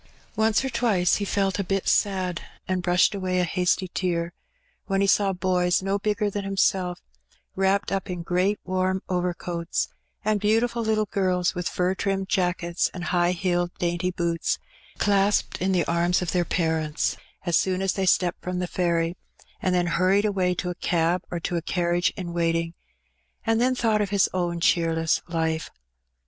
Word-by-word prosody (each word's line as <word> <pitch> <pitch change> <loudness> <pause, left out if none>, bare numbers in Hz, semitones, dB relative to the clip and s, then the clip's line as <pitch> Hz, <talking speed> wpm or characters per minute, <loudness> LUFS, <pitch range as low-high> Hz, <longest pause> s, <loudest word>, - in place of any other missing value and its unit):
Once 220 +3 +2
or - - -1
twice 220 -7 +2
he 205 - -2
felt 195 0 0
a - - +1
bit 195 +1 -1
sad, 185 -3 +1 0.3
and 185 -1 0
brushed 180 +3 +3
away 185 -2 -1
a - - +3
hasty 180 +1 +1
tear, 170 -2 -2 0.5
when 195 -1 +1
he 200 - +3
saw 195 0 +3
boys 180 -1 +1
no 195 +1 0
bigger 210 +1 0
than 205 0 -3
himself 190 -2 +1 0.6
wrapped 195 +1 +1
up 195 0 -2
in 180 -2 -4
great 185 +4 +1
warm 185 0 -1
overcoats, 175 -1 -2 0.4
and 215 -1 +2
beautiful 225 +3 +1
little 215 -1 +1
girls 185 -3 0
with 180 -1 -2
fur 180 +1 0
trimmed 195 0 -1
jackets 180 -2 0
and 180 - -5
high 175 -1 +3
heeled 175 -1 0
dainty 175 +1 0
boots, 170 -2 -1 0.4
clasped 200 -2 +2
in 190 +1 +1
the 175 -4 +2
arms 175 +2 +1
of 175 - -2
their 180 -1 +2
parents 160 -3 0 0.3
as 175 -2 +1
soon 185 +2 +2
as 195 -1 0
they 195 -1 -1
stepped 180 -1 +2
from 180 0 -3
the 180 - -1
ferry, 170 -1 0 0.5
and 185 -1 +1
then 175 -1 +2
hurried 185 +4 +2
away 185 -3 +1
to 180 +1 -2
a - - -6
cab 170 0 +1
or 175 - -3
to 175 +1 -2
a - - -1
carriage 175 0 +1
in 175 -3 -5
waiting 165 -1 0 0.4
— 60 0 -41
and 225 +1 +2
then 255 +1 +3
thought 220 -3 +2
of 205 - -1
his 200 -1 +3
own 175 -2 -1
cheerless 165 -1 +2
life. 160 -2 -1
180 Hz, 180 wpm, -25 LUFS, 175-195 Hz, 0.6 s, brushed